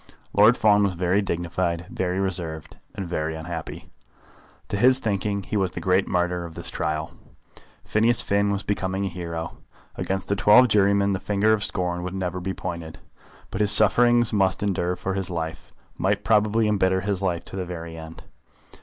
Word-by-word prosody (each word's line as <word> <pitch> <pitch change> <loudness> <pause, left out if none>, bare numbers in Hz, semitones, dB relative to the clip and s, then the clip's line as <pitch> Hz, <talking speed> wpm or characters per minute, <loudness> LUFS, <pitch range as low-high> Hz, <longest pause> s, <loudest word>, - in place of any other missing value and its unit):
Lord 110 +4 +5
Fawn 105 -1 +4
was 100 -3 +1
very 90 +3 +1
dignified, 85 -1 -2
very 90 0 -2
reserved, 85 -5 -3 0.2
and 95 -3 -5
very 80 -2 -3
unhappy. 80 0 -7 0.8
To 100 - -2
his 130 +5 +5
thinking 100 -4 -2
he 105 - -5
was 95 -3 +1
the - - -5
great 95 +1 +1
martyr 90 0 -1
of 85 -1 -9
this 85 -1 -6
trial. 75 0 -3 0.7
Phineas 115 +2 +2
Finn 100 0 +1
was 100 0 -1
becoming 95 -1 -2
a - - -2
hero. 85 -2 -6 0.4
Against 95 0 -3
the 100 - 0
twelve 115 +6 +6
jurymen 100 -1 +3
the 95 - -2
finger 105 +2 +1
of 105 -1 0
scorn 90 -2 -2
would 90 +1 -5
never 90 -1 -3
be 95 +2 -3
pointed. 85 -4 -6 0.5
But 95 - -2
his 105 - +3
sufferings 120 +2 +5
must 95 -1 +1
endure 90 -3 -1
for 95 +1 -4
his 95 -1 -3
life 80 -2 -5 0.3
might 100 +2 0
probably 110 0 +2
embitter 95 -3 +1
his 100 -1 -2
life 90 -3 -2
to - - -9
the 95 - -3
very 85 -2 -7
end. 80 0 -10
95 Hz, 180 wpm, -24 LUFS, 85-105 Hz, 0.8 s, twelve